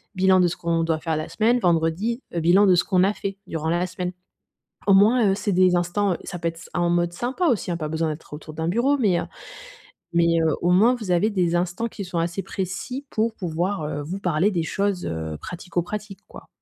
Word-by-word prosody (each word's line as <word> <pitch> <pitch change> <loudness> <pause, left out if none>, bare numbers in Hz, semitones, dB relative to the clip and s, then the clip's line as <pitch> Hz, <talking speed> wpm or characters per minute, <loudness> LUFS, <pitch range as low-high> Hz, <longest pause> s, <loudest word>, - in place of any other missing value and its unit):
Bilan 190 0 +4
de 180 - +4
ce - - -5
qu'on 165 -1 0
doit 160 -1 0
faire 160 0 -2
la 155 0 -4
semaine, 235 +3 +2
vendredi, 175 +6 +1
heu, 170 - 0
bilan 180 +5 +5
de 185 - +6
ce 175 - +3
qu'on 185 -1 +2
a 200 - +1
fait 195 -1 -5
durant 160 -1 -3
la 175 +2 +1
semaine. 180 0 -4 0.8
Au 195 - +6
moins, 210 +1 +5
heu, - - +1
c'est 205 +1 -2
des 185 -1 +4
instants 175 +2 +1
ça 175 - -6
peut 170 - -1
être 165 - -3
s 165 - -12
en 175 0 +1
mode 175 0 +1
sympa 255 - -1
aussi, 230 - 0
hein. - - -1
Pas 155 -2 -4
besoin 160 +1 -1
d'être 155 0 -8
autour 155 +1 -9
d'un 160 +2 -2
bureau, 250 +9 +2
mais 200 -9 +2
heu, - - -2 0.9
mais 170 0 +4
heu, 160 -2 +2
au 175 - +1
moins 220 +8 +5
vous 215 -7 -4
avez 175 +5 +3
des 175 -3 +1
instants 180 +6 -1
qui 205 - -7
sont 175 -1 -3
assez 170 +3 -2
précis 195 +9 -5
pour 225 +1 0
pouvoir, 175 0 -2
heu, 150 -1 -3
vous 180 +7 -5
parler 180 +2 +1
des 170 -4 -1
choses, 200 +1 -1
heu, 80 -2 -4
pratico-pratiques 180 +3 -5
quoi. - - -13
180 Hz, 230 wpm, -23 LUFS, 165-200 Hz, 0.9 s, de